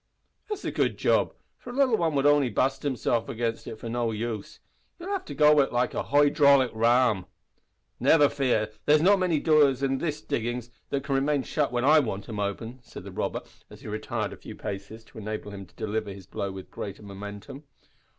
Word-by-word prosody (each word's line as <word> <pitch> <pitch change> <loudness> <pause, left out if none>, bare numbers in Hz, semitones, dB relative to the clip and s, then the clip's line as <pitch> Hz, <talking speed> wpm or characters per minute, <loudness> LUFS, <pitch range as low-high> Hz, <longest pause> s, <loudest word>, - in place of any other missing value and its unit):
"That's 420 -2 -4
a - - -1
good - - 0
job, - - +2 0.2
for - - -11
a - - -6
little 255 -6 +2
un 160 -3 +1
would 140 0 +1
only 145 -3 +4
bust 135 +5 0
hisself 125 -3 -1
agin 115 -2 -1
it 110 - -6
for 115 - -8
no 120 0 -1
use. 110 -1 -4 0.4
You'll 365 +2 -6
have 385 -2 -2
to - - -7
go 150 0 +6
at 135 - +2
it - - -14
like 120 0 +1
a - - -1
hoy 145 0 +3
draulic 140 -4 +5
ram." 115 -3 +3 0.7
"Never 150 -3 +5
fear. 120 -7 0 0.2
There's 150 +1 +5
not 200 +2 +5
many 175 -5 +1
doors 145 -4 +4
in 135 -1 +1
these 155 -3 -2
diggin's 120 -4 -3 0.2
that 140 -1 -1
can 140 - -2
remain 140 +1 +1
shut 145 -2 -1
when 120 +1 0
I 155 +2 +7
want 105 -8 -3
'em 110 -3 -5
open," 110 +5 -4
said - - -11
the - - -9
robber, - - -3 0.3
as - - -14
he - - -10
retired 110 +1 -3
a - - -10
few - - -10
paces 105 +2 -7
to 110 - -13
enable 105 0 -5
him 100 -2 -8
to 105 - -27
deliver 110 0 -3
his 95 -1 -10
blow 100 +1 -4
with 95 -1 -10
greater 100 +1 -7
momentum. 105 +7 -9
125 Hz, 215 wpm, -27 LUFS, 110-145 Hz, 0.7 s, I